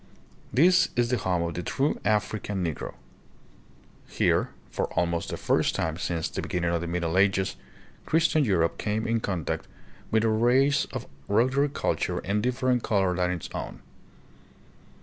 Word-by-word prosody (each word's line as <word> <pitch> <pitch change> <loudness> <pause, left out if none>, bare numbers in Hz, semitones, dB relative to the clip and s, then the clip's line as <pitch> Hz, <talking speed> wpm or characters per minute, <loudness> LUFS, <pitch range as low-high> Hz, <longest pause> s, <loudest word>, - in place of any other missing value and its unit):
This 175 +7 +5
is 120 -1 +2
the 125 - +2
home 90 -2 0
of 85 0 -3
the 90 - -3
true 140 +10 -1
African 105 -2 0
Negro. 80 -3 -4 1.1
Here, - - +1 0.2
for - - -2
almost 85 -1 0
the - - -4
first - - +1
time, 80 0 -1
since 85 -2 -2
the - - -4
be - - -7
ginning 85 -1 0
of 85 - 0
the 85 - -4
Middle 85 +1 0
Ages, 95 -1 +2 0.5
Christian 160 -1 +3
Europe 85 -8 +1
came 110 +1 -1
in 115 0 +1
contact 95 -7 -3 0.4
with 110 0 +2
a - - +3
race 125 +6 +3
of - - -6 0.2
ruder 130 +7 +3
culture - - -1
and 100 +3 -1
different 125 0 +1
color 95 -5 +1
than 90 0 +1
its 90 -2 -3
own. - - -6
100 Hz, 160 wpm, -27 LUFS, 90-125 Hz, 1.1 s, This